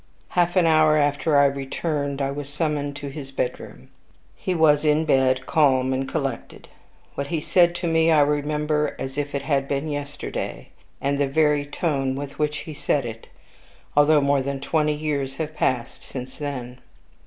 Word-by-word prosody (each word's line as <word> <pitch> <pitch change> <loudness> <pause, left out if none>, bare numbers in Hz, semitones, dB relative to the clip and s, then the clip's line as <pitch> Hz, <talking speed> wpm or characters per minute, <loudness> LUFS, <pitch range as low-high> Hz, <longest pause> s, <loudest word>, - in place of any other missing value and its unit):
Half 175 0 +1
an 180 -2 +4
hour 155 -1 +5
after 145 +1 +2
I 140 - +6
returned, 140 +1 -2
I 135 - -1
was 140 0 -6
summoned 145 -1 -2
to 145 0 -6
his 135 -1 -8
bedroom. 135 -2 -5 0.5
He 185 - -2
was 150 -2 +4
in 155 +1 +3
bed, 130 -3 +2
calm 130 -5 +3
and 135 +1 -2
collected. 135 -6 -4 0.5
What 140 - -4
he 165 +1 -1
said 175 +2 +3
to 175 0 -2
me 165 0 +3
I 155 -2 +5
remember 150 +1 0
as 135 0 -5
if 145 0 -3
it 140 - -2
had 140 -1 0
been 140 +2 -2
yesterday, 145 -1 -5 0.3
and 140 0 -1
the 140 - +2
very 150 0 +2
tone 140 -4 -1
with 140 0 -7
which 150 -1 -1
he 155 - -7
said 145 -2 0
it, 115 -1 -8 0.7
although 145 +1 +5
more 140 0 +2
than 140 +1 -3
twenty 150 +2 +1
years 145 -3 -2
have 155 +1 -4
passed 125 -5 -1
since 130 -1 -8
then. 130 -4 -5
145 Hz, 175 wpm, -23 LUFS, 135-155 Hz, 0.7 s, I